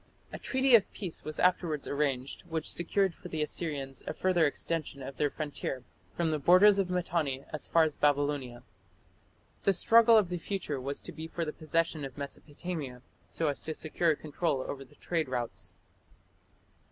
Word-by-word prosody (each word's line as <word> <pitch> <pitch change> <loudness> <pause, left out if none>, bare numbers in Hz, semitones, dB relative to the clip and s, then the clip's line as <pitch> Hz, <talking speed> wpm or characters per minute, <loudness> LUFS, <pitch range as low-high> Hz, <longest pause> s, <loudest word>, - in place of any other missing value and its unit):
A - - -5
treaty 265 0 +2
of 225 -4 +6
peace 185 -6 -5
was 155 - -6
afterwards 170 -4 +1
arranged, 140 -2 -1
which 160 -1 0
secured 190 +2 +1
for - - -11
the 155 -1 -1
Assyrians 145 -4 -2
a - - -2
further 175 -4 +3
extension 145 -2 -3
of 135 0 -8
their 145 - +2
frontier 140 -4 -4 0.3
"from 170 -2 +1
the 155 - 0
borders 195 +6 +6
of 190 -2 +1
Mitanni 165 -7 -1
as 155 - -2
far 165 - +5
as 155 -2 -1
Babylonia". 145 -4 0 1.0
The 195 - +3
struggle 230 +4 +6
of 205 -5 +3
the 180 -1 -3
future 165 -7 -3
was 140 +2 -4
to - - -6
be 160 0 -7
for 165 0 -3
the 155 - -4
possession 165 -1 -1
of 135 0 -7
Mesopotamia, 145 -2 -6 0.2
so 165 - -1
as 145 - -1
to 155 - -4
secure 160 0 +1
control 150 -2 -1
over 135 -1 -6
the 130 - -20
trade 165 -5 -2
routes. 120 -2 -4
155 Hz, 175 wpm, -30 LUFS, 140-175 Hz, 1.0 s, of